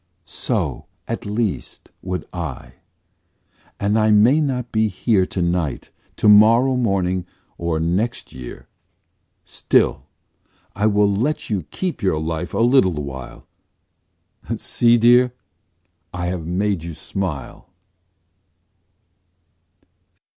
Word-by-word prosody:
So, - - -3 0.2
at - - -4
least, 105 -1 -3
would 90 -1 -4
I, 80 -7 -6 1.1
And 105 +2 +1
I 110 0 +3
may 115 +9 +5
not 125 -4 -2
be 110 0 +2
here 95 -1 +1
To 90 - -2
night, 85 -6 -2 0.2
to - - +1
morrow 115 +5 +6
morning 95 -6 0 0.3
or 85 -2 -1
next 95 +9 -2
year. 65 -1 -10 0.8
Still - - +1 0.7
I 105 +2 +1
will 105 -1 +3
let 115 +8 -1
you 95 -7 -2
keep 185 -2 -4
your 95 -6 +1
life 80 +2 -4
a - - +1
little 120 -8 +4
while, 70 -4 -7 1.1
See 120 0 +2
dear? 120 +2 +4 0.8
I 90 -1 -4
have 90 -2 -3
made 95 0 -1
you 85 -1 -7
smile. 80 -5 -5
100 Hz, 110 wpm, -21 LUFS, 85-115 Hz, 1.1 s, morrow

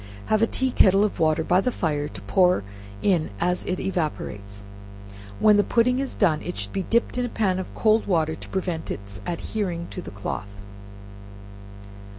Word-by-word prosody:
Have 215 - +3
a 225 - +4
tea 260 +2 0
kettle 195 -3 +5
of 210 - -1
water 160 0 +2
by 180 +3 +3
the 250 - 0
fire 150 -8 -1
to - - -10
pour 180 - +3 0.4
in 175 -6 +2
as 180 +1 +1
it 185 - -2
evaporates. 105 - -4 0.8
When 210 -1 +6
the 205 - +4
pudding 250 +3 +2
is 275 -1 -2
done, 160 -7 +2
it - - -5
should 100 0 -3
be 195 - -1
dipped 235 +5 0
in 250 - +1
a - - -4
pan 190 -5 0
of 185 - -7
cold 220 0 +3
water, 160 -4 +1
to - - -9
prevent 180 -4 -3
its 100 0 -5
adhering 175 0 -3
to 180 - -5
the - - -8
cloth. 100 0 -6
180 Hz, 180 wpm, -24 LUFS, 155-210 Hz, 0.8 s, When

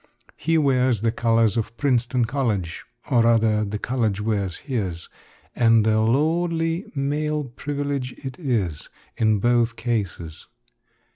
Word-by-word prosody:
He 165 +2 +1
wears 130 -6 +2
the 115 0 +1
colors 115 -2 +2
of 115 +1 -3
Princeton 125 -3 +1
College, 115 -9 -2 0.3
or 120 - +5
rather, 115 -2 +3
the 105 0 -3
college 110 -3 -1
wears 105 -4 -1
his; 95 - -3 0.5
and 115 -2 +4
a 110 0 +3
lordly 165 - 0
male 150 +2 -1
privilege 140 0 -4
it 130 +3 -6
is, 105 - -2 0.3
in 110 -2 +2
both 120 +2 +2
cases. 100 -10 -4
120 Hz, 125 wpm, -23 LUFS, 110-140 Hz, 0.5 s, or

